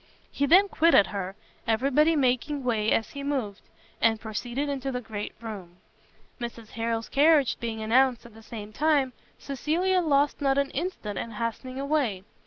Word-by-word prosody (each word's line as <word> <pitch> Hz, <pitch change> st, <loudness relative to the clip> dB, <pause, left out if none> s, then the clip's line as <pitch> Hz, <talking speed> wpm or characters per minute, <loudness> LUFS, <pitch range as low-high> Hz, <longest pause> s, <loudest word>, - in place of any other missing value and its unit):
He 285 Hz, -, 0 dB
then 380 Hz, +7 st, +6 dB
quitted 330 Hz, -, +5 dB
her, 195 Hz, -1 st, -4 dB, 0.3 s
every 230 Hz, +5 st, +1 dB
body 305 Hz, +4 st, +4 dB
making 275 Hz, +1 st, +1 dB
way 220 Hz, -3 st, +1 dB
as 225 Hz, -, +1 dB
he 280 Hz, -, -7 dB
moved, 260 Hz, -8 st, -3 dB, 0.4 s
and 225 Hz, -1 st, +3 dB
proceeded 240 Hz, +5 st, -3 dB
into 275 Hz, -1 st, -3 dB
the 250 Hz, -, -2 dB
great 215 Hz, -3 st, -6 dB
room. 200 Hz, -6 st, -8 dB, 0.6 s
Mrs 235 Hz, -2 st, -7 dB
Harrel's 230 Hz, 0 st, -2 dB
carriage 290 Hz, -2 st, +4 dB
being 225 Hz, -2 st, -4 dB
announced 245 Hz, +1 st, +3 dB
at 235 Hz, -, -13 dB
the 225 Hz, -, -14 dB
same 215 Hz, -2 st, -9 dB
time, 285 Hz, -2 st, +2 dB, 0.2 s
Cecilia 340 Hz, +7 st, 0 dB
lost 290 Hz, -2 st, +2 dB
not 275 Hz, -1 st, +2 dB
an 280 Hz, -1 st, +1 dB
instant 280 Hz, -, -4 dB
in -, -, -4 dB
hastening 230 Hz, +4 st, -4 dB
away. 275 Hz, -9 st, 0 dB
255 Hz, 165 wpm, -27 LUFS, 225-285 Hz, 0.6 s, then